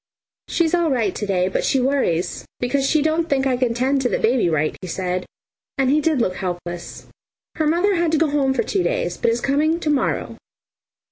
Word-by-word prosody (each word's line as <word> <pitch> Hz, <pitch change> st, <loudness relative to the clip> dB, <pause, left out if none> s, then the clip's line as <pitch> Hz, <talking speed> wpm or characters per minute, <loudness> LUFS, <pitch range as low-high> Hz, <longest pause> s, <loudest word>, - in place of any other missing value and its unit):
"She's 335 Hz, -1 st, 0 dB
all 345 Hz, -2 st, +2 dB
right 230 Hz, -8 st, 0 dB
to 210 Hz, -, -4 dB
day, 185 Hz, -2 st, +1 dB
but 190 Hz, -, -1 dB
she 270 Hz, -, +2 dB
worries 250 Hz, -10 st, 0 dB, 0.2 s
because 270 Hz, +2 st, 0 dB
she 310 Hz, -3 st, +3 dB
don't 320 Hz, +1 st, 0 dB
think 270 Hz, -1 st, +1 dB
I 260 Hz, -2 st, +2 dB
can 245 Hz, -2 st, 0 dB
tend 265 Hz, +3 st, +1 dB
to 250 Hz, -, +1 dB
the -, -, 0 dB
baby 230 Hz, -5 st, +2 dB
right," 155 Hz, -1 st, 0 dB
he 185 Hz, -, -6 dB
said; 180 Hz, +1 st, -3 dB, 0.5 s
and 270 Hz, -1 st, +2 dB
he 305 Hz, +2 st, +3 dB
did 310 Hz, -2 st, +1 dB
look 185 Hz, -6 st, 0 dB
helpless. 175 Hz, -1 st, -5 dB, 0.5 s
"Her 310 Hz, -2 st, +1 dB
mother 350 Hz, +6 st, +2 dB
had 340 Hz, -3 st, +1 dB
to -, -, +4 dB
go 310 Hz, -1 st, +2 dB
home 270 Hz, -2 st, +1 dB
for -, -, +1 dB
two 400 Hz, -2 st, -1 dB
days, -, -, -1 dB
but -, -, +1 dB
is 230 Hz, +1 st, 0 dB
coming 305 Hz, +4 st, +1 dB
to 315 Hz, -, -2 dB
morrow. 290 Hz, -, -1 dB
270 Hz, 215 wpm, -21 LUFS, 205-315 Hz, 0.5 s, to